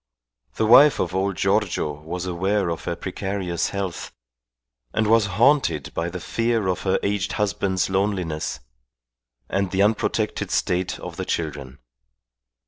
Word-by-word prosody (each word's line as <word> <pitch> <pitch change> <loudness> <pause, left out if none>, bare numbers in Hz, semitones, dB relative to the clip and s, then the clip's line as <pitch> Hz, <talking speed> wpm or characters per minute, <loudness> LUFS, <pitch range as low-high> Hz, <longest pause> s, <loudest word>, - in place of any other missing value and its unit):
The 110 - +1
wife 140 +6 +7
of - - -1
old 95 +1 0
Giorgio 95 -5 +1
was 85 +4 -5
aware 95 +2 0
of 85 - -5
her 85 - -2
precarious 95 -1 -3
health, 100 -3 -4 0.8
and 110 - +2
was 110 -1 +4
haunted 125 - +3
by 85 +1 -2
the 90 +1 -6
fear 115 +3 0
of 90 -3 -1
her 95 - +1
aged 100 -1 -1
husband's 100 -2 0
loneliness 95 -8 -1 0.9
and 100 -1 -1
the 95 +2 +2
unprotected 105 +1 0
state 90 0 0
of - - -8
the - - -3
children. 70 -5 -4
95 Hz, 135 wpm, -23 LUFS, 90-105 Hz, 0.9 s, wife